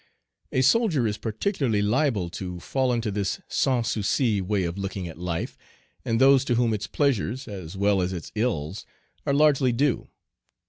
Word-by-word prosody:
A 130 Hz, -, +2 dB
soldier 160 Hz, -, +3 dB
is 105 Hz, -1 st, -2 dB
particularly 115 Hz, -, 0 dB
liable 105 Hz, -, +1 dB
to 90 Hz, 0 st, -6 dB
fall 130 Hz, +6 st, 0 dB
into 115 Hz, -3 st, -1 dB
this 100 Hz, -1 st, -2 dB
sans 125 Hz, -4 st, +1 dB
souci 110 Hz, 0 st, +1 dB
way 95 Hz, +1 st, 0 dB
of 85 Hz, 0 st, -3 dB
looking 95 Hz, -2 st, -4 dB
at 80 Hz, -1 st, -10 dB
life, 85 Hz, -2 st, -4 dB, 0.4 s
and 115 Hz, 0 st, 0 dB
those 135 Hz, 0 st, +6 dB
to 120 Hz, -, +1 dB
whom 115 Hz, -1 st, +2 dB
its 105 Hz, -, -3 dB
pleasures, 130 Hz, -2 st, 0 dB
as 95 Hz, -3 st, -7 dB
well 100 Hz, -1 st, +2 dB
as 90 Hz, +1 st, -1 dB
its 85 Hz, -5 st, -6 dB
ills, 105 Hz, -6 st, -2 dB, 0.4 s
are 140 Hz, -, +2 dB
largely 145 Hz, -3 st, +4 dB
due. 130 Hz, +2 st, 0 dB
110 Hz, 170 wpm, -25 LUFS, 95-130 Hz, 0.4 s, those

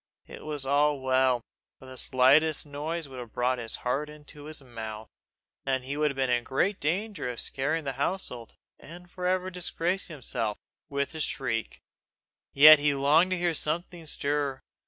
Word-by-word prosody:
It -, -, -11 dB
was 150 Hz, -3 st, -2 dB
well, 130 Hz, -3 st, +2 dB, 0.4 s
for -, -, -15 dB
the 130 Hz, 0 st, -10 dB
slightest 140 Hz, +6 st, +3 dB
noise 150 Hz, +3 st, -4 dB
would 130 Hz, -2 st, -9 dB
have 120 Hz, -3 st, -9 dB
brought 125 Hz, +1 st, 0 dB
his 115 Hz, -2 st, -2 dB
heart 140 Hz, +4 st, 0 dB
into 150 Hz, -1 st, -11 dB
his 155 Hz, 0 st, -8 dB
mouth, 110 Hz, -4 st, -7 dB, 0.5 s
and 130 Hz, -1 st, -1 dB
he 135 Hz, +2 st, -4 dB
would 150 Hz, 0 st, +2 dB
have 140 Hz, -, -5 dB
been 135 Hz, -1 st, +1 dB
in 120 Hz, -1 st, +2 dB
great 180 Hz, +11 st, 0 dB
danger 180 Hz, -, -2 dB
of 120 Hz, -, -6 dB
scaring 155 Hz, +4 st, -1 dB
the 135 Hz, -2 st, -3 dB
household, 135 Hz, -9 st, -3 dB, 0.2 s
and 175 Hz, +3 st, -13 dB
for 180 Hz, -1 st, -3 dB
ever 185 Hz, 0 st, 0 dB
disgracing 180 Hz, 0 st, -2 dB
himself, 115 Hz, -6 st, -2 dB, 0.3 s
with 140 Hz, 0 st, -2 dB
a 160 Hz, -, -6 dB
shriek. 115 Hz, -6 st, -3 dB, 0.7 s
Yet 155 Hz, +2 st, +9 dB
he 145 Hz, -1 st, +2 dB
longed 150 Hz, +6 st, +4 dB
to 185 Hz, -, 0 dB
hear 175 Hz, -1 st, +1 dB
something 165 Hz, +1 st, -3 dB
stir. 145 Hz, -2 st, -1 dB
145 Hz, 170 wpm, -28 LUFS, 130-160 Hz, 0.7 s, Yet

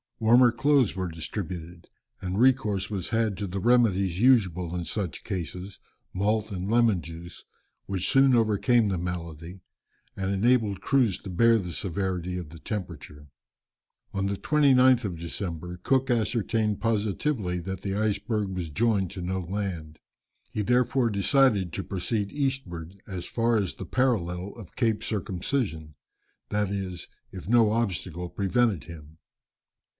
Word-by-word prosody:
Warmer 120 Hz, +2 st, +6 dB
clothes 135 Hz, -1 st, +2 dB
were 95 Hz, -1 st, -2 dB
distributed, 85 Hz, 0 st, -6 dB, 0.3 s
and 95 Hz, +2 st, -2 dB
recourse 115 Hz, -7 st, +2 dB
was 95 Hz, -3 st, -3 dB
had 110 Hz, -4 st, 0 dB
to 100 Hz, -, -3 dB
the 95 Hz, +2 st, -4 dB
remedies 100 Hz, -6 st, +3 dB
usual 95 Hz, -9 st, +3 dB
in 90 Hz, -1 st, -3 dB
such 90 Hz, 0 st, -4 dB
cases, 90 Hz, 0 st, -5 dB, 0.3 s
malt 105 Hz, +3 st, 0 dB
and 95 Hz, 0 st, -4 dB
lemon 115 Hz, -5 st, +3 dB
juice, 85 Hz, +1 st, -10 dB, 0.4 s
which 95 Hz, -2 st, -2 dB
soon 135 Hz, -1 st, +5 dB
overcame 115 Hz, +1 st, +3 dB
the 95 Hz, -, -1 dB
malady, 85 Hz, 0 st, -6 dB, 0.5 s
and 95 Hz, 0 st, -2 dB
enabled 105 Hz, 0 st, +2 dB
the -, -, -22 dB
crews 125 Hz, -9 st, +2 dB
to 95 Hz, -, -9 dB
bear 115 Hz, +6 st, +4 dB
the 90 Hz, -5 st, -4 dB
severity 90 Hz, 0 st, -2 dB
of 85 Hz, -4 st, -6 dB
the 85 Hz, +1 st, -12 dB
temperature. 75 Hz, -8 st, -7 dB, 0.8 s
On 100 Hz, 0 st, -1 dB
the 100 Hz, -, -1 dB
29th 130 Hz, -4 st, +4 dB
of 90 Hz, -5 st, -4 dB
December, 85 Hz, 0 st, -5 dB
Cook 130 Hz, +7 st, +1 dB
ascertained 110 Hz, -2 st, 0 dB
positively 105 Hz, -2 st, 0 dB
that 95 Hz, +1 st, -5 dB
the 95 Hz, -1 st, -3 dB
iceberg 105 Hz, 0 st, -1 dB
was 90 Hz, -3 st, -4 dB
joined 100 Hz, +2 st, +1 dB
to 95 Hz, -, -6 dB
no 95 Hz, +2 st, -2 dB
land. 90 Hz, -4 st, -4 dB, 0.5 s
He 105 Hz, -, -2 dB
therefore 125 Hz, +2 st, +2 dB
decided 100 Hz, -, +3 dB
to 95 Hz, -, -3 dB
proceed 100 Hz, +2 st, -2 dB
eastward 100 Hz, -, -3 dB
as 90 Hz, -3 st, -5 dB
far 115 Hz, 0 st, +1 dB
as 100 Hz, -4 st, -1 dB
the -, -, -7 dB
parallel 100 Hz, -8 st, 0 dB
of 105 Hz, -8 st, -12 dB
Cape 115 Hz, -4 st, 0 dB
Circumcision, 95 Hz, -, -3 dB, 0.5 s
that 105 Hz, -1 st, 0 dB
is, 95 Hz, -3 st, -4 dB, 0.2 s
if 95 Hz, -1 st, -9 dB
no 115 Hz, -1 st, +4 dB
obstacle 90 Hz, -6 st, -2 dB
prevented 100 Hz, -, +1 dB
him. 80 Hz, -1 st, -12 dB
100 Hz, 145 wpm, -27 LUFS, 90-115 Hz, 0.8 s, Warmer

